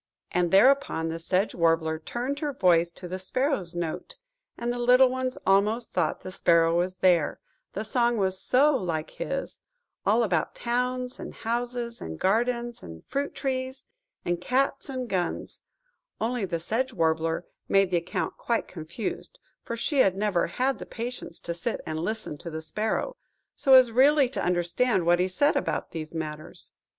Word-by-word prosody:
"–and 175 Hz, -1 st, +1 dB
thereupon 195 Hz, -5 st, +4 dB
the 165 Hz, 0 st, -4 dB
Sedge 185 Hz, +5 st, 0 dB
Warbler 165 Hz, -2 st, +1 dB
tuned 250 Hz, -, -3 dB
her 295 Hz, -2 st, -2 dB
voice 175 Hz, -5 st, +3 dB
to 180 Hz, -, -9 dB
the 185 Hz, +2 st, -5 dB
Sparrow's 195 Hz, -, -1 dB
note, 175 Hz, -, -4 dB, 0.4 s
and 240 Hz, +1 st, -2 dB
the 245 Hz, -, -4 dB
little 250 Hz, +2 st, +6 dB
ones 255 Hz, 0 st, -2 dB
almost 210 Hz, +5 st, +2 dB
thought 165 Hz, -4 st, 0 dB
the 185 Hz, -, -7 dB
Sparrow 170 Hz, -3 st, +3 dB
was 180 Hz, +2 st, 0 dB
there, 180 Hz, -5 st, +2 dB, 0.3 s
the 210 Hz, -, -3 dB
song 240 Hz, 0 st, +1 dB
was 190 Hz, -2 st, 0 dB
so 285 Hz, +3 st, +4 dB
like 170 Hz, -8 st, -2 dB
his–all -, -, -3 dB
about 175 Hz, -7 st, 0 dB
towns, 250 Hz, +1 st, -2 dB
and -, -, -7 dB
houses, 240 Hz, 0 st, -3 dB
and 80 Hz, -1 st, -6 dB
gardens 235 Hz, +3 st, 0 dB
and 80 Hz, -1 st, -11 dB
fruit 285 Hz, +1 st, -3 dB
trees, 260 Hz, -1 st, -3 dB, 0.4 s
and 175 Hz, 0 st, -1 dB
cats, 275 Hz, +5 st, 0 dB
and 255 Hz, -2 st, -3 dB
guns; 180 Hz, -5 st, -3 dB, 0.6 s
only 230 Hz, -1 st, -1 dB
the 170 Hz, -2 st, -2 dB
Sedge 235 Hz, +10 st, -1 dB
Warbler 165 Hz, -2 st, 0 dB, 0.2 s
made 195 Hz, -1 st, +4 dB
the 175 Hz, -, +3 dB
account 170 Hz, +1 st, -3 dB
quite 235 Hz, -1 st, -1 dB
confused, 170 Hz, -, -6 dB, 0.2 s
for 235 Hz, -, -5 dB
she 280 Hz, +4 st, 0 dB
had 195 Hz, -6 st, +4 dB
never 200 Hz, -4 st, +1 dB
had 260 Hz, +10 st, -1 dB
the -, -, -8 dB
patience 235 Hz, -6 st, -6 dB
to 170 Hz, -, -4 dB
sit 175 Hz, +8 st, -3 dB
and 155 Hz, 0 st, -3 dB
listen 210 Hz, -4 st, -4 dB
to 170 Hz, -, -6 dB
the 160 Hz, 0 st, -6 dB
Sparrow, 220 Hz, -, -2 dB, 0.4 s
so 265 Hz, -1 st, +5 dB
as 255 Hz, -2 st, +7 dB
really 275 Hz, +3 st, +5 dB
to 270 Hz, -, -3 dB
understand 180 Hz, +3 st, +1 dB
what 175 Hz, +1 st, +4 dB
he 180 Hz, -, +2 dB
said 285 Hz, +12 st, +2 dB
about 280 Hz, -, -1 dB
these 155 Hz, -2 st, -6 dB
matters. 155 Hz, -2 st, -6 dB
210 Hz, 165 wpm, -27 LUFS, 170-250 Hz, 0.6 s, as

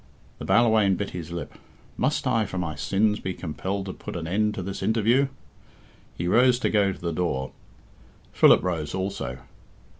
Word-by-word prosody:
The -, -, -6 dB
Ballawhaine 110 Hz, -5 st, +4 dB
bit 100 Hz, +2 st, -4 dB
his 85 Hz, -2 st, -7 dB
lip. 85 Hz, 0 st, -6 dB, 0.4 s
"Must 145 Hz, +3 st, 0 dB
I, 115 Hz, -5 st, +1 dB
for 95 Hz, -, -6 dB
my 85 Hz, -4 st, -2 dB
sins, 105 Hz, +7 st, +1 dB
be 95 Hz, -1 st, -4 dB
compelled 95 Hz, +4 st, -4 dB
to 95 Hz, -, -5 dB
put -, -, -8 dB
an 85 Hz, -2 st, -4 dB
end 105 Hz, +4 st, 0 dB
to 95 Hz, -, -4 dB
this 95 Hz, +1 st, -5 dB
interview?" 115 Hz, +6 st, +2 dB, 0.9 s
He 85 Hz, -, -2 dB
rose 125 Hz, +6 st, +4 dB
to -, -, +1 dB
go 100 Hz, -2 st, +3 dB
to -, -, -9 dB
the 85 Hz, -1 st, -3 dB
door. 80 Hz, -6 st, -2 dB, 0.8 s
Philip -, -, +6 dB
rose 80 Hz, -5 st, -2 dB
also. 95 Hz, -10 st, -3 dB
95 Hz, 175 wpm, -25 LUFS, 85-110 Hz, 0.9 s, Philip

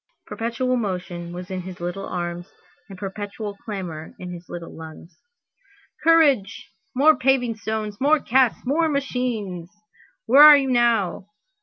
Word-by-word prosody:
Perpetual 245 Hz, +2 st, -2 dB
motion 180 Hz, -5 st, -4 dB
was 180 Hz, +2 st, -8 dB
in 185 Hz, -1 st, -3 dB
his 180 Hz, 0 st, -9 dB
little 175 Hz, +3 st, -5 dB
arms 175 Hz, 0 st, -5 dB, 0.4 s
and 195 Hz, -, -10 dB
perpetual 205 Hz, +2 st, -6 dB
clamor 180 Hz, -7 st, -7 dB
in 180 Hz, -1 st, -8 dB
his 175 Hz, 0 st, -11 dB
little 170 Hz, -1 st, -8 dB
lungs. 160 Hz, +1 st, -12 dB, 0.8 s
"Courage! 285 Hz, -14 st, +3 dB, 0.2 s
more 300 Hz, +4 st, +5 dB
paving 250 Hz, -3 st, +1 dB
stones! 215 Hz, -1 st, -5 dB
more 300 Hz, +3 st, +4 dB
casks! 255 Hz, -2 st, +1 dB
more 315 Hz, +5 st, +1 dB
machines! 245 Hz, -, -3 dB, 0.6 s
Where 265 Hz, +5 st, +6 dB
are 300 Hz, -1 st, +11 dB
you 270 Hz, -2 st, -1 dB
now? 230 Hz, -6 st, +1 dB
210 Hz, 135 wpm, -22 LUFS, 180-255 Hz, 0.8 s, are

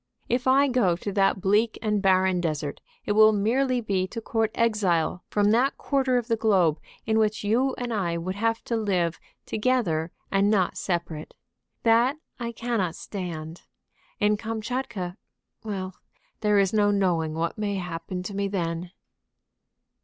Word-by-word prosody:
If 250 Hz, +2 st, 0 dB
I 275 Hz, +2 st, +5 dB
go 240 Hz, -10 st, +2 dB
to 200 Hz, +4 st, -5 dB
that 195 Hz, 0 st, +2 dB
bleak 210 Hz, +4 st, +2 dB
and 210 Hz, -2 st, 0 dB
barren 185 Hz, -2 st, +3 dB
desert, 150 Hz, -4 st, -3 dB, 0.2 s
it -, -, -1 dB
will 215 Hz, +1 st, +7 dB
merely 245 Hz, +5 st, +1 dB
be 195 Hz, -4 st, 0 dB
to 230 Hz, -, -6 dB
court 225 Hz, -1 st, 0 dB
exile 185 Hz, -7 st, +1 dB
from 205 Hz, 0 st, +2 dB
that 250 Hz, +5 st, +2 dB
quarter 265 Hz, -3 st, +1 dB
of 240 Hz, -2 st, -2 dB
the 230 Hz, -, +2 dB
globe 190 Hz, -8 st, +2 dB, 0.3 s
in 220 Hz, 0 st, +2 dB
which 215 Hz, -1 st, +1 dB
you 245 Hz, +6 st, +1 dB
and 245 Hz, -2 st, -3 dB
I 175 Hz, -5 st, -1 dB
would 180 Hz, +3 st, -3 dB
have 225 Hz, +3 st, -1 dB
to 235 Hz, -, -2 dB
live 185 Hz, -6 st, 0 dB, 0.3 s
together 210 Hz, -9 st, 0 dB, 0.2 s
and 195 Hz, +1 st, +3 dB
not 195 Hz, -4 st, +2 dB
separate. 170 Hz, -4 st, -3 dB, 0.5 s
That 235 Hz, +5 st, +4 dB, 0.2 s
I 235 Hz, -1 st, -3 dB
cannot 225 Hz, -7 st, -2 dB
stand. 170 Hz, -5 st, -6 dB, 0.6 s
In 210 Hz, 0 st, +3 dB
Kamtchatka 220 Hz, -4 st, -4 dB, 0.5 s
Well, 190 Hz, -3 st, -4 dB, 0.5 s
there 210 Hz, -1 st, +2 dB
is 195 Hz, 0 st, +3 dB
no 205 Hz, -1 st, +4 dB
knowing 175 Hz, -6 st, +1 dB
what 165 Hz, +5 st, -2 dB
may 205 Hz, -1 st, -1 dB
happen 180 Hz, 0 st, -5 dB
to 200 Hz, -, -6 dB
me 200 Hz, 0 st, 0 dB
then." 175 Hz, -2 st, -3 dB
205 Hz, 155 wpm, -26 LUFS, 180-225 Hz, 0.6 s, will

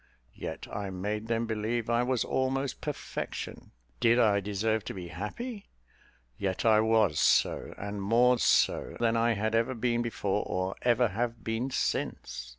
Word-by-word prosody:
Yet -, -, -6 dB
I 100 Hz, -1 st, -4 dB
made 105 Hz, +4 st, -3 dB
them 115 Hz, 0 st, 0 dB
believe 110 Hz, +1 st, -2 dB
I 120 Hz, 0 st, +2 dB
was 125 Hz, -1 st, 0 dB
almost 135 Hz, +1 st, -1 dB
perfection. 150 Hz, -2 st, -5 dB, 0.3 s
Did 120 Hz, 0 st, +4 dB
I 105 Hz, -4 st, +4 dB
deserve 105 Hz, +2 st, -1 dB
to -, -, -5 dB
be 90 Hz, -2 st, -7 dB
happy? 200 Hz, -, -6 dB, 0.7 s
Yet 95 Hz, +2 st, -2 dB
I 110 Hz, -1 st, +6 dB
was 110 Hz, -7 st, +3 dB
so, -, -, +2 dB
and 100 Hz, 0 st, -5 dB
more 120 Hz, +4 st, +4 dB
so -, -, +2 dB
than 115 Hz, -1 st, +2 dB
I 115 Hz, 0 st, +3 dB
had 110 Hz, +1 st, -1 dB
ever 115 Hz, +3 st, +1 dB
been 120 Hz, 0 st, 0 dB
before 105 Hz, -4 st, -1 dB
or 95 Hz, +1 st, -1 dB
ever 120 Hz, -1 st, +3 dB
have 115 Hz, +2 st, -3 dB
been 115 Hz, +4 st, -2 dB
since. -, -, -2 dB
115 Hz, 155 wpm, -29 LUFS, 105-120 Hz, 0.7 s, I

